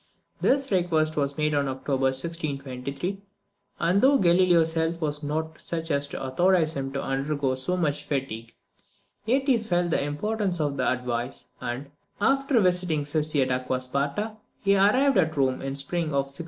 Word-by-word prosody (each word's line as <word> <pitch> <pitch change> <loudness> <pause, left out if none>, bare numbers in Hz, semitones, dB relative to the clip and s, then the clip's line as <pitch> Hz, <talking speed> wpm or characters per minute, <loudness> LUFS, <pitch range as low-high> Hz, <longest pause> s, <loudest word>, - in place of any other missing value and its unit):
This 275 -1 +2
request 160 -4 +1
was 140 0 -1
made 150 0 +1
in 140 -1 +1
October 135 0 -1
1623; 140 +3 -3 0.6
and 175 +4 +2
though 275 +2 +6
Galileo's 175 -4 +4
health 165 +1 0
was 150 -2 -2
not 155 +2 -3
such 165 -1 -3
as 140 0 +1
to - - -6
authorise 165 +4 +2
him 135 -1 -3
to 135 - -2
undergo 135 0 -1
so 130 +8 -2
much 150 -4 0
fatigue, 115 -5 -4 0.7
yet 265 +4 +2
he 255 -4 +4
felt 175 -5 0
the - - +2
importance 185 +5 -1
of 145 -2 -1
the 130 - +1
advice, 125 0 -3 0.2
and, 130 +4 -5 0.3
after 275 +3 +3
visiting 180 -5 +2
Cesi 150 -1 +1
at 130 - -2
Acqua 130 0 -1
Sparta, 140 +12 -2 0.3
he 200 0 +4
arrived 215 +5 +4
at 160 -3 +1
Rome 130 -2 +1
in 135 0 -3
the - - -6
spring 165 +5 -1
of 140 -3 0
1624. - - -4
155 Hz, 170 wpm, -26 LUFS, 135-180 Hz, 0.7 s, though